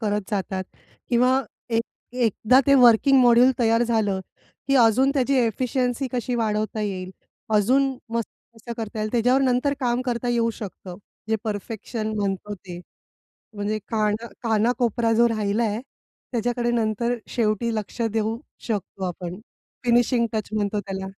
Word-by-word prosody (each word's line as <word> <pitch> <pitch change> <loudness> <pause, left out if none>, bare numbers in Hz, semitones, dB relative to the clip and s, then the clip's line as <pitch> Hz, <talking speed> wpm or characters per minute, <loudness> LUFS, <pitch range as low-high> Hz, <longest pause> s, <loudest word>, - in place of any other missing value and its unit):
करत 210 -2 -2
जातात 190 -2 -2 0.4
किंवा 255 +2 +3 0.4
एक - - +1 0.3
एकदा 245 +1 +3
ते 280 - +6
वर्किंग 245 +3 +6
मॉड्यूल 245 +1 +6
तयार 230 0 +3
झालं, 215 -5 +1 0.5
की 275 - +3
अजून 250 +3 +5
त्याची 275 0 +2
एफिशियन्सी 250 +2 0
कशी 245 0 -2
वाढवता 215 -1 -1
येईल, 185 -3 -3 0.4
अजून 265 +6 +3 0.2
मस्त 230 -1 -1 0.3
कसं 230 +1 -8
करता 220 -1 -5
येईल, 215 0 -2
त्याच्यावर 245 +3 +3
नंतर 260 +2 +2
काम 245 -1 +1
करता 245 -1 -2
येऊ 235 -1 +2
शकतं, 190 -4 -8 0.3
जे 220 - +2
परफेक्शन 215 +1 -4
म्हणतो 200 +1 -2
ते. 180 -2 -10 0.7
म्हणजे 205 +1 -2
काना 215 +1 0 0.2
काना-कोपरा 230 0 +1
जो 235 0 +5
राहिला, 215 0 0 0.6
त्याच्याकडे 240 +1 0
नंतर 235 +1 0 0.2
शेवटी 225 0 0
लक्ष 215 +2 -5
देऊ 225 +1 -1 0.3
शकतो 195 -2 -3
आपण. 180 +1 -5 0.4
फिनिशिंग 240 0 +3
टच 215 -2 -2
म्हणतो 210 -1 0
त्याला. 190 -1 -5
225 Hz, 135 wpm, -24 LUFS, 210-245 Hz, 0.7 s, ते